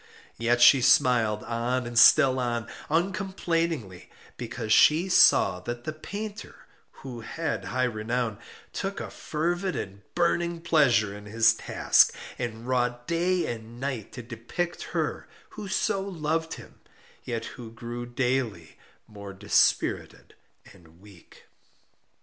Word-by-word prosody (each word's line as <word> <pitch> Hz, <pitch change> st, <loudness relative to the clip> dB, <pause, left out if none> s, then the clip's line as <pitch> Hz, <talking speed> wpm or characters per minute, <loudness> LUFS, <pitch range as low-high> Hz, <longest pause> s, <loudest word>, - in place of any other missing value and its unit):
Yet 120 Hz, +1 st, +1 dB
she 135 Hz, +2 st, +8 dB
smiled 115 Hz, -4 st, +3 dB
on 120 Hz, +2 st, -2 dB
and 120 Hz, 0 st, -7 dB
still 130 Hz, 0 st, +6 dB
on, 120 Hz, -3 st, -2 dB, 0.2 s
uncomplainingly, 165 Hz, -, -2 dB, 0.3 s
because 115 Hz, -2 st, -3 dB
she 165 Hz, -, +5 dB
saw 95 Hz, -, +5 dB
that 120 Hz, +5 st, -6 dB
the 155 Hz, -, -4 dB
painter 205 Hz, +7 st, -7 dB, 0.5 s
(who 125 Hz, -3 st, -7 dB
had 160 Hz, +7 st, -4 dB
high 130 Hz, 0 st, -1 dB
renown) 115 Hz, -1 st, -2 dB, 0.3 s
took -, -, -4 dB
a -, -, -6 dB
fervid 175 Hz, +4 st, -2 dB
and 100 Hz, +1 st, -6 dB
burning 170 Hz, -1 st, 0 dB
pleasure 125 Hz, -12 st, +3 dB
in 105 Hz, 0 st, -11 dB
his 115 Hz, +2 st, +4 dB
task, -, -, +3 dB, 0.2 s
and 120 Hz, -1 st, -5 dB
wrought 120 Hz, -1 st, -1 dB
day 175 Hz, +2 st, +1 dB
and 115 Hz, 0 st, -7 dB
night 130 Hz, -6 st, -4 dB
to 125 Hz, -, -8 dB
depict 120 Hz, +10 st, -5 dB
her -, -, -2 dB, 0.2 s
who 205 Hz, -, -8 dB
so 195 Hz, +1 st, 0 dB
loved 165 Hz, -4 st, -2 dB
him, -, -, -14 dB, 0.4 s
yet 115 Hz, -2 st, -4 dB
who 115 Hz, -3 st, -9 dB
grew 120 Hz, +1 st, -7 dB
daily 120 Hz, -, -2 dB, 0.3 s
more 100 Hz, -2 st, -10 dB
dispirited 100 Hz, +2 st, 0 dB, 0.4 s
and 85 Hz, -3 st, -20 dB
weak. 100 Hz, -3 st, -18 dB
125 Hz, 125 wpm, -26 LUFS, 110-165 Hz, 0.5 s, she